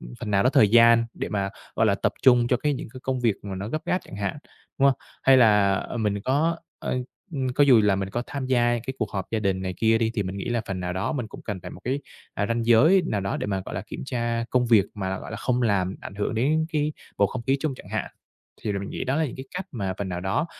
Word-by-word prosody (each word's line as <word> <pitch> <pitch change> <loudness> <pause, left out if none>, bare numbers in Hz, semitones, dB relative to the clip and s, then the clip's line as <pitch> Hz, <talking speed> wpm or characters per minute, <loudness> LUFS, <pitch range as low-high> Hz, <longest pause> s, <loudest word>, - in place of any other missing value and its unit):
ưm, - - -10
phần 105 - -4
nào 100 -1 +3
đó 125 - +4
thời 135 -8 +5
gian 115 +1 +6
để - - -4
mà, 100 -2 -1 0.3
gọi 115 - +3
là, 100 - +3
tập 100 - 0
trung 125 -2 +6
cho 125 - +3
cái 145 +3 0
những 130 - -6
cái 130 - -9
công 130 -2 -1
việc 115 -4 +2
mà 100 -2 -5
nó 100 +3 -5
gấp 155 +5 -3
gáp 180 - +1
chẳng 100 - -10
hạn, 100 +6 -2 0.4
đúng 140 - +5
hông? 135 - +3 0.3
Hay 135 -1 +6
là, 105 -5 +5
ờ, 110 - -4
mình 105 -3 0
có, 155 +9 +1 0.2
ơ, 125 - -2 0.3
ưm, 135 -4 -1
có 145 +3 +3
dù 125 -5 +7
là 105 -2 +3
mình 95 0 -3
có 120 +3 -2
tham 140 -3 -4
gia 120 -2 +2
cái 130 - -3
cuộc 110 - -2
họp 95 -2 -2
gia 115 - 0
đình 95 -3 0
này 95 -1 -3
kia 115 +2 +3
đi 115 -1 +1
thì 105 - 0
mình 95 +1 -5
nghĩ 95 - -4
là 120 -1 0
phần 95 -1 -3
nào 90 0 -3
đó 95 +9 -1
mình 125 -6 -3
cũng - - -11
cần 100 -4 -5
phải - - -8
một - - -11
cái, 135 +3 -1 0.3
à, 100 - 0
ranh 115 0 -1
giới 155 +12 +6
nào 105 - -1
đó 95 0 -2
để - - -3
mà, 95 -2 -1
gọi - - -7
là, 90 - -3
kiểm - - -7
tra 120 -2 -1
công 125 -1 +2
việc 110 -5 +5
mà, 95 -2 -3
gọi - - -9
là, 110 - -4
không 125 +2 0
làm 95 -4 +1
ảnh - - -8
hưởng 105 +2 -2
đến 155 +7 +2
cái 150 0 0 0.3
bầu - - +5
không 125 -2 -5
khí 135 +3 +2
chung 150 -4 -1
chẳng - - -13
hạn. - - -3 0.5
Thì 105 - -1
rồi 100 - -2
mình 100 - -6
nghĩ - - -4
đó 135 +3 0
là 160 - +2
những 125 - -7
cái 130 - -7
cách 185 +1 -4
mà 95 -6 -3
phần 100 - -3
nào 90 -1 -3
đó 95 - 0
115 Hz, 295 wpm, -25 LUFS, 100-130 Hz, 0.5 s, dù